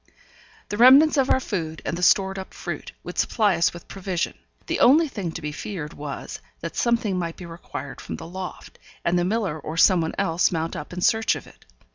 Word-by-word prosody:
The 205 Hz, -, -3 dB
remnants 270 Hz, +7 st, +8 dB
of 270 Hz, -2 st, +2 dB
our -, -, +4 dB
food, 165 Hz, -10 st, -4 dB
and -, -, -1 dB
the 175 Hz, -, -5 dB
stored 190 Hz, +1 st, +3 dB
up 190 Hz, -, -9 dB
fruit, -, -, -6 dB
would -, -, -6 dB
supply 210 Hz, -5 st, +2 dB
us 170 Hz, 0 st, +2 dB
with 175 Hz, -, -12 dB
provision; 185 Hz, -3 st, -3 dB, 0.3 s
the -, -, -2 dB
only 305 Hz, +6 st, +6 dB
thing 200 Hz, -, -4 dB
to 165 Hz, -, -7 dB
be 150 Hz, -, -3 dB
feared 160 Hz, -1 st, -6 dB
was, 145 Hz, -1 st, -6 dB, 0.2 s
that 165 Hz, -, -5 dB
something 230 Hz, -6 st, +1 dB
might 170 Hz, -1 st, -3 dB
be 180 Hz, -, -8 dB
required 165 Hz, -5 st, -8 dB
from -, -, -6 dB
the 165 Hz, -, -8 dB
loft, 185 Hz, +2 st, -8 dB, 0.3 s
and 175 Hz, +1 st, +2 dB
the -, -, +1 dB
miller 190 Hz, -5 st, -1 dB
or 155 Hz, +2 st, -6 dB
someone 165 Hz, -2 st, +4 dB
else 165 Hz, +2 st, +2 dB
mount 165 Hz, -1 st, -2 dB
up 150 Hz, -, -7 dB
in 180 Hz, 0 st, -5 dB
search 220 Hz, +4 st, +3 dB
of -, -, -8 dB
it. -, -, -19 dB
180 Hz, 210 wpm, -24 LUFS, 165-210 Hz, 0.3 s, remnants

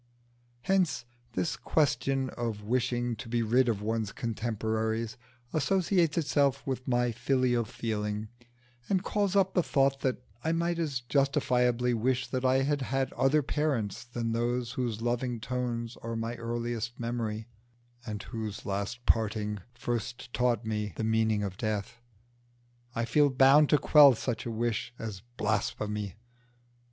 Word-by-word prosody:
Hence 185 Hz, -9 st, +1 dB, 0.3 s
this 90 Hz, -4 st, -1 dB
question 135 Hz, -3 st, +1 dB
of 115 Hz, -3 st, -4 dB
wishing 120 Hz, +1 st, 0 dB
to 110 Hz, -, -8 dB
be 120 Hz, 0 st, +1 dB
rid 120 Hz, +3 st, +3 dB
of 105 Hz, -3 st, -1 dB
one's 110 Hz, -1 st, -1 dB
contemporaries 110 Hz, 0 st, -2 dB, 0.4 s
associates 175 Hz, +1 st, +2 dB
itself 140 Hz, -4 st, +2 dB
with 130 Hz, -1 st, -3 dB
my 120 Hz, -1 st, +2 dB
filial 120 Hz, 0 st, +1 dB
feeling, 105 Hz, -1 st, -3 dB, 0.6 s
and 190 Hz, -2 st, +2 dB
calls 205 Hz, -2 st, 0 dB
up 190 Hz, -1 st, +3 dB
the 180 Hz, -, +4 dB
thought 135 Hz, -3 st, +2 dB
that 130 Hz, -2 st, -1 dB, 0.2 s
I 160 Hz, -, +1 dB
might 170 Hz, +1 st, 0 dB
as 145 Hz, -7 st, -1 dB
justifiably 125 Hz, -2 st, +2 dB
wish 125 Hz, +2 st, +1 dB
that 130 Hz, -1 st, -2 dB
I 130 Hz, +1 st, +3 dB
had 145 Hz, 0 st, 0 dB
had 135 Hz, +1 st, -1 dB
other 140 Hz, +3 st, +3 dB
parents 135 Hz, -9 st, -1 dB
than 120 Hz, -1 st, -3 dB
those 120 Hz, +1 st, 0 dB
whose 115 Hz, -3 st, -2 dB
loving 120 Hz, 0 st, -1 dB
tones 120 Hz, -1 st, -3 dB
are 115 Hz, 0 st, -4 dB
my 115 Hz, +1 st, -2 dB
earliest 120 Hz, 0 st, -3 dB
memory, 115 Hz, -2 st, -3 dB, 0.6 s
and 105 Hz, -4 st, -5 dB
whose 110 Hz, -3 st, -5 dB
last 100 Hz, +5 st, -3 dB
parting 105 Hz, -2 st, +1 dB, 0.2 s
first 120 Hz, -1 st, -4 dB
taught 120 Hz, -2 st, +1 dB
me 105 Hz, -3 st, -2 dB
the -, -, -3 dB
meaning 110 Hz, -1 st, +2 dB
of 95 Hz, -2 st, -4 dB
death. 110 Hz, 0 st, -3 dB, 0.9 s
I 115 Hz, -, 0 dB
feel 145 Hz, +5 st, +4 dB
bound 135 Hz, +3 st, +6 dB
to 150 Hz, -, +6 dB
quell 145 Hz, -2 st, +7 dB
such 115 Hz, 0 st, -3 dB
a -, -, -2 dB
wish 115 Hz, +1 st, -2 dB
as 105 Hz, -4 st, -6 dB, 0.2 s
blasphemy. 105 Hz, -1 st, -1 dB
120 Hz, 145 wpm, -30 LUFS, 110-135 Hz, 0.9 s, quell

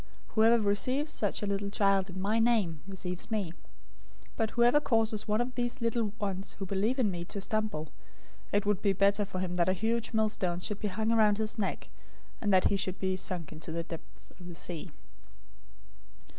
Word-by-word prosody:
018:005 -, -, -23 dB
Whoever 225 Hz, +1 st, +5 dB
receives 255 Hz, +9 st, +1 dB
one -, -, -4 dB
such -, -, -4 dB
little 200 Hz, 0 st, -1 dB
child 195 Hz, -1 st, +2 dB
in 190 Hz, +1 st, -6 dB
my 210 Hz, +4 st, +1 dB
name 215 Hz, -10 st, +2 dB
receives 180 Hz, -1 st, -5 dB
me, 205 Hz, -7 st, -1 dB
018:006 -, -, -14 dB, 0.8 s
but 225 Hz, -2 st, 0 dB
whoever 240 Hz, +6 st, +4 dB
causes 225 Hz, -6 st, +1 dB
one 210 Hz, +1 st, +2 dB
of 250 Hz, +1 st, -3 dB
these 245 Hz, +1 st, -2 dB
little 230 Hz, -2 st, 0 dB
ones 195 Hz, -2 st, -3 dB
who 195 Hz, -, -4 dB
believe 200 Hz, +7 st, 0 dB
in 230 Hz, -6 st, +2 dB
me 175 Hz, -1 st, -4 dB
to 200 Hz, -, -5 dB
stumble, 215 Hz, -7 st, -2 dB, 0.6 s
it 205 Hz, 0 st, +2 dB
would 205 Hz, -2 st, +1 dB
be 200 Hz, -2 st, +3 dB
better 200 Hz, +2 st, +3 dB
for 190 Hz, -2 st, -6 dB
him 180 Hz, -1 st, -2 dB
that 175 Hz, +1 st, +3 dB
a -, -, +4 dB
huge 225 Hz, +4 st, -1 dB
millstone 210 Hz, -5 st, +1 dB
should 205 Hz, +3 st, -3 dB
be 210 Hz, -, -1 dB
hung 220 Hz, +3 st, 0 dB
around 215 Hz, -3 st, +4 dB
his 220 Hz, +1 st, -1 dB
neck, 200 Hz, -, -2 dB, 0.5 s
and 205 Hz, -, +1 dB
that 185 Hz, -1 st, +5 dB
he -, -, +2 dB
should 190 Hz, -1 st, -2 dB
be 190 Hz, -1 st, 0 dB
sunk 180 Hz, -4 st, -3 dB
in 155 Hz, -, -9 dB
the 165 Hz, +1 st, -4 dB
depths 165 Hz, -1 st, -10 dB
of 180 Hz, -1 st, -13 dB
the 175 Hz, -, -8 dB
sea. 175 Hz, +1 st, -5 dB
205 Hz, 200 wpm, -31 LUFS, 185-220 Hz, 0.8 s, Whoever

